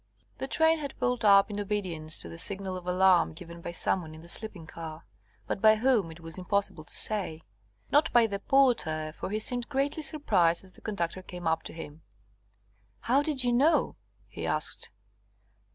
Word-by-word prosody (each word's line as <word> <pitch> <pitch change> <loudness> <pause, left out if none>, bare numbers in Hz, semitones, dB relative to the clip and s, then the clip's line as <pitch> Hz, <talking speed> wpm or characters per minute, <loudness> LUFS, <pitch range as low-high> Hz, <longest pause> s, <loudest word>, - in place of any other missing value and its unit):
The 265 - -3
train 320 +2 +3
had 285 -2 -6
pulled 250 -1 -1
up 200 0 +6
in 205 - -4
obedience 185 -7 -1
to - - -3
the 85 0 -8
signal 195 -1 -2
of 180 -1 -8
alarm 180 -2 +4
given 170 +1 -10
by 170 - -5
some 180 +2 0
one 155 -2 -10
in 160 - -12
the - - -13
sleeping 185 -2 -3
car, 160 -1 -9 0.4
but - - -3
by 220 0 +7
whom 220 -6 +2
it 160 +1 -11
was 165 +1 -6
impossible 195 -3 -1
to - - -8
say. 185 -7 0 0.5
Not 295 +2 +4
by 240 -1 +6
the 200 -2 -3
porter, 185 - +2
for - - -5
he 210 - -1
seemed 245 +2 -2
greatly 285 +2 -1
surprised 200 - +1
as 190 - -15
the - - -19
conductor 185 -3 -3
came 180 -1 -9
up 160 0 +1
to - - -7
him. 160 -1 -9 1.0
"How 265 +4 +3
did 290 -3 0
you 245 -1 +2
know?" 285 +7 +3 0.3
he - - -6
asked. - - -2
195 Hz, 190 wpm, -29 LUFS, 165-245 Hz, 1.0 s, by